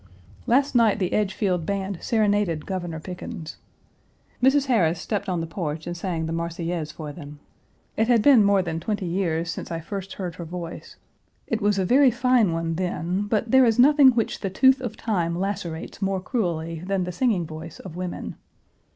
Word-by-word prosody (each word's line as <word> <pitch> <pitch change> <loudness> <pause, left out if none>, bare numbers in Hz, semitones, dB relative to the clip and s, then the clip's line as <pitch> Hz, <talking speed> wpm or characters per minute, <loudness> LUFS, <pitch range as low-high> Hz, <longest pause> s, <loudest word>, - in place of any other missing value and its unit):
Last 270 +4 +3
night 230 -4 +4
the 185 -4 -1
Edgefield 190 -4 0
Band 195 0 -3
serenaded 205 -8 +1
Governor 175 -4 -4
Pickens. 170 -2 -7 0.8
Mrs. 270 +2 +4
Harris 180 -11 +2
stepped 200 +2 -3
on 175 -2 -1
the - - -2
porch 160 -2 -4
and 175 0 -4
sang 170 -2 -3
the 160 - -3
Marseillaise 170 -1 -3
for 155 -1 -7
them. 145 -2 -10 0.6
It 220 - +1
has 240 -2 +5
been 255 -3 +6
more 200 -1 +3
than 165 -2 -3
twenty 205 +3 -3
years 170 -2 -1
since - - -6
I 165 - -3
first 195 +3 -6
heard 180 -3 -5
her 175 - -5
voice; 170 0 -7 0.5
it 225 0 -2
was 205 0 +2
a 190 - +1
very 265 +6 +5
fine 245 -4 +3
one 165 0 -2
then, 180 +2 -2
but 220 +1 0
there 265 0 +7
is 230 -3 +3
nothing 285 +2 +7
which 240 -4 +2
the 195 - -2
tooth 265 +7 +4
of 240 -4 -5
time 175 -7 -1
lacerates 180 -2 -4
more 195 -1 0
cruelly 170 -7 -2
than 195 0 -1
the 180 - -4
singing 195 -3 +1
voice 160 +1 -9
of 180 -4 -9
women. 180 0 -5
185 Hz, 185 wpm, -24 LUFS, 165-220 Hz, 0.8 s, there